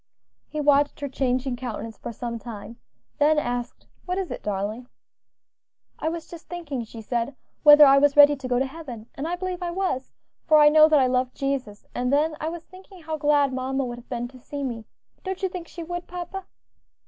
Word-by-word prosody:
He 305 - -4
watched 290 0 +3
her 285 - -2
changing 255 -1 -1
countenance 235 -3 -5
for - - -6
some 235 +1 -5
time, 230 0 -9 0.4
then 300 +1 +4
asked, 245 -4 -3 0.2
"What 365 0 -2
is 385 -2 -3
it, - - -5
darling?" 210 +4 -3 1.1
"I 315 - 0
was 335 0 -5
just 340 -1 -12
thinking," 300 -8 -4
she 225 0 -10
said, 240 +4 -2 0.3
"whether 295 0 +9
I 275 0 +7
was 290 0 +3
ready 290 0 +9
to 270 -2 -7
go 245 -1 +1
to 260 - +2
heaven, 265 -6 -8
and 285 +4 -4
I 350 - -1
believe 365 0 -4
I 350 - -2
was; 345 -8 -2 0.4
for 310 - +6
I 295 0 +8
know 310 0 +7
that 310 - +5
I 260 - +4
love 255 0 0
Jesus; 265 -7 -3
and 250 +1 -1
then 305 +2 +2
I 315 - -1
was 340 0 -7
thinking 375 -1 -15
how 315 0 -3
glad 290 -2 +3
mamma 265 +1 -1
would 240 -1 -6
have 240 - -18
been 240 -1 -3
to 255 0 -15
see 285 +3 -6
me; 235 -4 -4 0.4
don't 380 0 -5
you 380 - +2
think 355 -2 -7
she 340 - -8
would, 350 +1 -5
papa?" 360 +2 -6
280 Hz, 210 wpm, -25 LUFS, 250-320 Hz, 1.1 s, whether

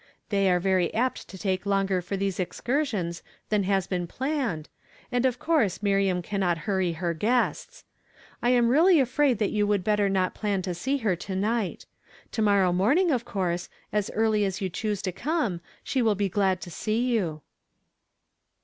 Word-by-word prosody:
"They 195 -2 +2
are 180 -1 +3
very 185 -1 +1
apt 250 +3 -1
to 190 - -10
take 185 -1 -1
longer 195 -2 +1
for 185 +3 -4
these 195 -1 -2
excursions 200 - -2 0.3
than 210 -2 +1
has 195 -1 +1
been 180 -2 -2
planned, 260 - -2 0.4
and 245 +1 +2
of 250 -1 -2
course 250 - +1
Miriam 195 -3 +2
cannot 185 -3 0
hurry 190 -4 0
her 170 +1 -2
guests. 245 - -1 0.6
I 240 - +2
am 240 -2 +4
really 325 +6 +5
afraid 265 -1 +2
that 210 -1 0
you 210 -1 +1
would 205 -3 +1
better 210 0 +2
not 185 -1 +1
plan 200 -3 -1
to 180 -1 -2
see 265 +11 -1
her 190 -4 +3
to 190 +3 -5
night. 210 +1 -1 0.5
To 220 - -2
morrow 200 -4 +3
morning, 280 - +3
of 245 -4 0
course, 180 -2 -2 0.2
as 210 -1 0
early 220 -1 +2
as 195 -1 -1
you 190 -3 -2
choose 210 +1 -2
to 185 - -1
come, 235 - -1 0.2
she 265 - 0
will 220 -3 +3
be 200 0 0
glad 190 -1 +1
to 175 - -8
see 220 +7 -1
you." 165 -9 -1
200 Hz, 180 wpm, -26 LUFS, 185-235 Hz, 0.6 s, really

